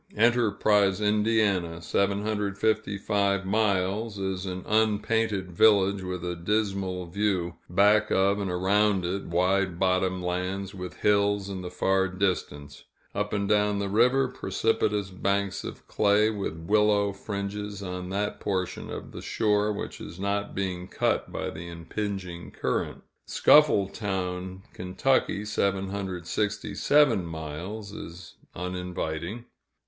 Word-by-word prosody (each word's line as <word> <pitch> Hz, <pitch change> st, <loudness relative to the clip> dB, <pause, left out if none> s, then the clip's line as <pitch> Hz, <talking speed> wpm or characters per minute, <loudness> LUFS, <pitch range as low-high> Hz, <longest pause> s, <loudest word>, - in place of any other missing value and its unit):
Enterprise, 105 Hz, -4 st, +3 dB
Ind. 105 Hz, 0 st, +2 dB, 0.6 s
(755 100 Hz, 0 st, 0 dB
miles), 100 Hz, +1 st, 0 dB
is 95 Hz, -1 st, -3 dB
an 90 Hz, 0 st, -4 dB
unpainted 110 Hz, -2 st, +1 dB
village 100 Hz, +1 st, +4 dB
with 90 Hz, -1 st, -4 dB
a 90 Hz, 0 st, -2 dB
dismal 95 Hz, 0 st, -1 dB
view 90 Hz, -1 st, -1 dB
back 105 Hz, +4 st, +4 dB
of 100 Hz, +1 st, +2 dB
and 100 Hz, -2 st, -2 dB
around 95 Hz, +1 st, +2 dB
it, 95 Hz, +3 st, -2 dB
wide 90 Hz, +1 st, +1 dB
bottom 95 Hz, 0 st, +1 dB
lands, 90 Hz, +2 st, -3 dB
with 90 Hz, -2 st, -7 dB
hills 100 Hz, -1 st, +2 dB
in 95 Hz, -2 st, -5 dB
the 90 Hz, -, -5 dB
far 95 Hz, +1 st, +1 dB
distance; 90 Hz, -7 st, -3 dB, 0.3 s
up 105 Hz, +1 st, -2 dB
and 100 Hz, -1 st, -1 dB
down 105 Hz, -1 st, +2 dB
the 100 Hz, -1 st, -2 dB
river, 125 Hz, +6 st, +4 dB
precipitous 105 Hz, -3 st, 0 dB
banks 100 Hz, +1 st, -1 dB
of -, -, -8 dB
clay, 105 Hz, +1 st, +3 dB
with 100 Hz, -7 st, -4 dB
willow 100 Hz, +3 st, +2 dB
fringes 100 Hz, 0 st, -5 dB
on 90 Hz, -1 st, -5 dB
that 100 Hz, +2 st, -2 dB
portion 95 Hz, -2 st, -2 dB
of -, -, -7 dB
the -, -, -8 dB
shore 105 Hz, -1 st, +1 dB
which 105 Hz, -, -5 dB
is 85 Hz, -, -9 dB
not 100 Hz, +1 st, -2 dB
being 90 Hz, -2 st, -3 dB
cut -, -, 0 dB
by -, -, -3 dB
the 85 Hz, +2 st, -8 dB
impinging 90 Hz, +1 st, -5 dB
current. -, -, -2 dB, 0.2 s
Scuffletown, 95 Hz, -8 st, +2 dB
Ky. 100 Hz, +3 st, 0 dB
(767 100 Hz, -, +1 dB
miles), 85 Hz, +6 st, -6 dB
is 85 Hz, -3 st, -9 dB, 0.2 s
uninviting. 90 Hz, +3 st, -4 dB
100 Hz, 120 wpm, -27 LUFS, 90-105 Hz, 0.6 s, village